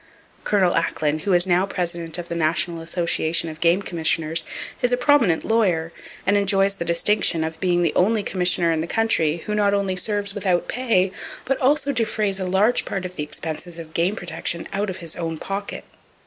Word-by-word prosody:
Col. 190 -4 +2
Acklen, 155 -2 0
who 195 +3 0
is 175 0 +3
now 185 +1 +2
president 170 -3 -3
of 175 -1 -6
the - - -5
National 165 +1 0
Association 170 -1 0
of 155 0 -9
Game 175 +4 +3
Commissioners, 165 -2 +1 0.4
is 245 - +1
a 245 - +2
prominent 245 - +3
lawyer, 180 -8 +1 0.3
and 200 +3 +3
enjoys 200 -1 +2
the - - -3
distinction 170 0 +2
of 160 0 -5
being 175 -1 +1
the 165 - +1
only 210 +3 +2
commissioner 180 -3 +1
in 160 -1 0
the 165 - -4
country 170 -8 +1
who 210 - -3
not 205 -1 +2
only 195 -2 -1
serves 200 +1 +1
without 185 -3 0
pay, 220 -7 +1 0.3
but 270 - -1
also 285 +2 +2
defrays 215 -5 0
a 185 - -2
large 200 +6 +2
part 195 -2 -4
of 180 0 -7
the - - -4
expenses 160 +3 -4
of 160 -1 -10
game 175 +5 +1
protection 170 -2 -3
out 200 +1 -1
of 185 - -5
his 160 - -6
own 165 -2 -4
pocket." 195 +4 -5
180 Hz, 190 wpm, -22 LUFS, 165-205 Hz, 0.4 s, is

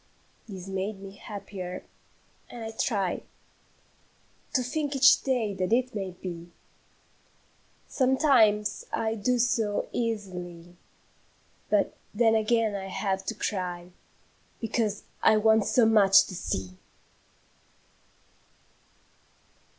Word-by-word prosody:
This 190 -2 -8
made 195 +1 -3
me 195 0 -9
happier, 195 -4 -7 0.7
and 235 -2 -8
I 225 - -5
try 200 -4 -1 1.3
To 255 - +3
think 285 +3 -2
each 275 +1 +6
day 245 -6 0
that 185 +1 -2
it 250 +2 +2
may 195 -3 -3
be. 170 -2 -6 1.4
Sometimes 255 -6 +3
I 220 0 -1
do 235 +3 0
so 225 -3 0
easily; 180 -7 -4 0.9
But - - +1 0.2
then 225 0 +4
again 220 0 +2
I 195 -1 -4
have 195 0 -2
to 225 - -2
cry, 180 -3 -4 0.7
Because 220 -3 -1 0.2
I 220 - +5
want 220 0 +4
so 245 - +4
much 205 -3 +6
to - - -9
SEE! 95 - -4
210 Hz, 105 wpm, -27 LUFS, 190-230 Hz, 1.4 s, each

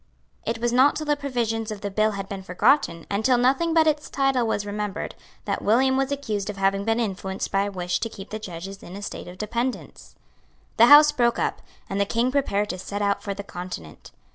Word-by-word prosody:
It 230 - 0
was 235 +1 -1
not 260 +3 +5
till 310 - -3
the 295 0 +2
provisions 235 -6 -2
of 210 -2 -6
the 200 -1 -4
bill 215 +2 +2
had 195 -1 -5
been 195 -1 -6
forgotten, 185 - +2
and 200 +2 -2
till 255 0 +4
nothing 270 +7 +2
but 325 -1 +4
its 300 -1 0
title 270 -4 +1
was 205 -2 -1
remembered, 205 -1 -4 0.3
that - - -2
William 260 +5 +3
was 270 +1 0
accused 215 -8 -2
of 205 - -5
having 195 0 +1
been 225 +2 +1
influenced 195 -3 -3
by 195 +1 +2
a 205 - -4
wish 180 -2 -2
to 230 - -3
keep 200 -2 -11
the 215 - -4
judges 195 0 -8
in 180 - -10
a 200 - -7
state - - -6
of 180 +1 -10
dependence. 235 +5 -4 0.6
The 235 - +7
Houses 295 +2 +9
broke 240 -5 +1
up; - - -1 0.3
and 195 +1 -1
the - - +3
King 235 +4 +1
prepared 210 -7 0
to 185 - -6
set 205 +2 -4
out 200 0 +1
for 200 -1 -4
the 200 - -6
Continent. 180 - -8
215 Hz, 225 wpm, -24 LUFS, 195-255 Hz, 0.6 s, Houses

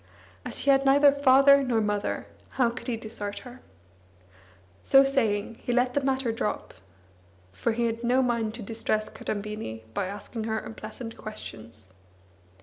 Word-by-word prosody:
As - - -2
she 280 - +4
had 270 0 +4
neither 280 +1 +6
father 280 0 +6
nor 250 -4 +1
mother, 210 -1 -1 0.3
how 245 -3 +3
could 255 - -8
he 240 -2 -1
desert 215 -2 -5
her? 250 +1 -11 1.2
So 270 0 +6
saying, 230 -5 0
he - - -3
let 250 +1 +2
the 285 - +1
matter 265 -3 0
drop, 225 -2 -3 0.8
far 95 - -1
he 235 +1 0
had 230 0 -2
no 250 +2 +3
mind 230 -3 -1
to 230 - -7
distress 215 0 -2
Kadambini 210 - -5
by 190 - -1
asking 205 +3 -6
her 220 0 -1
unpleasant 225 +2 -8
questions. 110 - -10
230 Hz, 150 wpm, -27 LUFS, 215-260 Hz, 1.2 s, neither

